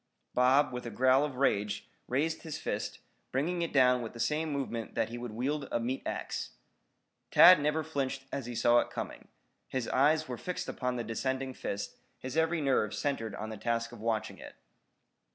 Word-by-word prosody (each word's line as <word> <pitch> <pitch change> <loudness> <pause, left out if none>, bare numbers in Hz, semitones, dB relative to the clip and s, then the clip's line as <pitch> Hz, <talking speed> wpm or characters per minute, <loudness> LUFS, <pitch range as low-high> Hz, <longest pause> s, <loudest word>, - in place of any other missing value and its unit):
Bob, 130 +2 +4
with 125 -1 -5
a - - -3
growl 130 +4 +4
of 145 -3 -3
rage, 105 -6 0 0.2
raised 150 +6 0
his 160 -3 -5
fist, - - -3 0.3
bringing 170 +7 0
it 170 - -1
down 125 -2 +5
with 115 - -6
the 115 - -10
same 155 +6 0
movement 125 -5 -3
that - - +1
he 120 - -6
would 120 -2 -5
wield 135 +5 -2
a - - +1
meat 125 +3 -2
axe. - - -4 0.8
Tad 180 -3 +9
never 150 +2 +1
flinched 135 -3 -2
as 135 -4 -4
he 120 - -5
saw 120 +1 +5
it - - -1
coming. - - -6 0.4
His 130 -3 -2
eyes 155 +4 +3
were 125 -2 -5
fixed 180 0 -4
upon 125 -1 -2
the 120 - -2
descending 130 +4 -2
fist, 100 -4 -5 0.2
his 130 +2 -6
every 160 0 +2
nerve 130 -7 +1
centered 115 -8 -2
on 110 +2 -5
the 110 - -6
task 115 +1 -1
of 120 - -11
watching 110 -1 -2
it. - - -10
130 Hz, 190 wpm, -31 LUFS, 120-145 Hz, 0.8 s, Tad